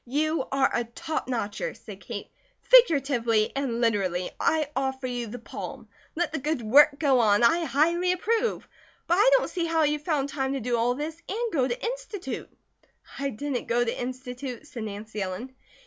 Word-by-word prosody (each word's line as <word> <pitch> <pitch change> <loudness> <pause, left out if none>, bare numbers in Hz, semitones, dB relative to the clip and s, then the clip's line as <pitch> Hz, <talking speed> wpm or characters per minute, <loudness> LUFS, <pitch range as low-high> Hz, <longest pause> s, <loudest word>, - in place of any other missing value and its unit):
"You 310 +3 0
are 270 0 +2
a 240 - +1
top 275 +7 -4
notcher," 245 - -3
said - - -11
Kate. - - -7 0.3
"Figuratively 275 - +4
and 265 -4 -1
literally, 190 -6 0
I 315 -2 +2
offer 265 0 -2
you 245 -2 -3
the 230 +3 -7
palm. 235 - -8 0.3
Let 335 -2 -1
the 315 - -1
good 295 -2 -2
work 285 +6 +6
go 275 -5 +3
on! 210 -1 +4
I 330 +8 +4
highly 340 +5 +2
approve; 450 +6 0 0.4
but 340 - +1
I 415 +7 +5
don't - - -2
see 345 -2 -1
how 325 -1 +2
you 300 0 +1
found 295 -3 -1
time 270 -1 -2
to 275 - -2
do 245 0 -1
all 235 +2 +1
this 310 +4 -5
and 455 +2 -2
go 260 -5 +2
to - - -3
Institute." 465 -5 -5 0.7
"I 275 0 -1
didn't 270 +1 -4
go 240 +1 +2
to 230 - -3
Institute," 250 +1 -6
said 240 -6 -6
Nancy 210 0 -6
Ellen. 195 +8 -5
275 Hz, 180 wpm, -26 LUFS, 235-320 Hz, 0.7 s, work